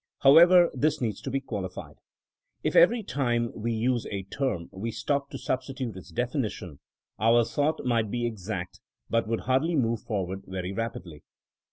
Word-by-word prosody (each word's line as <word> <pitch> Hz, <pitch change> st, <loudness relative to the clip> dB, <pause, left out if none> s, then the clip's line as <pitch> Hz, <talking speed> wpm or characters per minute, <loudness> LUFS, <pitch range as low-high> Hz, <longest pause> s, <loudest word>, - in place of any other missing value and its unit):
However, 175 Hz, +5 st, +7 dB
this 150 Hz, +3 st, +1 dB
needs 110 Hz, -5 st, -2 dB
to -, -, -5 dB
be 135 Hz, +1 st, 0 dB
qualified. 105 Hz, -8 st, -6 dB, 0.7 s
If -, -, -1 dB
every 220 Hz, +7 st, +6 dB
time 120 Hz, -, 0 dB
we 115 Hz, +1 st, -2 dB
used 120 Hz, +1 st, 0 dB
a 100 Hz, -2 st, -4 dB
term 95 Hz, -4 st, -2 dB
we 100 Hz, +5 st, -4 dB
stopped 140 Hz, +5 st, -2 dB
to -, -, -6 dB
sub 130 Hz, -, -1 dB
stitute 130 Hz, -4 st, -5 dB
its 95 Hz, -, -11 dB
defijiition, 115 Hz, -, -3 dB, 0.4 s
our 115 Hz, +2 st, +4 dB
thought 145 Hz, +6 st, -1 dB
might 115 Hz, -3 st, +1 dB
be 120 Hz, +2 st, -1 dB
exact 100 Hz, -5 st, -5 dB, 0.3 s
but 115 Hz, -1 st, +1 dB
would 115 Hz, 0 st, -1 dB
hardly 135 Hz, +7 st, +1 dB
move 115 Hz, -5 st, +1 dB
forward 95 Hz, -3 st, -3 dB
very 95 Hz, -1 st, -4 dB
rap 115 Hz, +1 st, -3 dB
idly. 80 Hz, -5 st, -10 dB
115 Hz, 170 wpm, -27 LUFS, 105-135 Hz, 0.7 s, However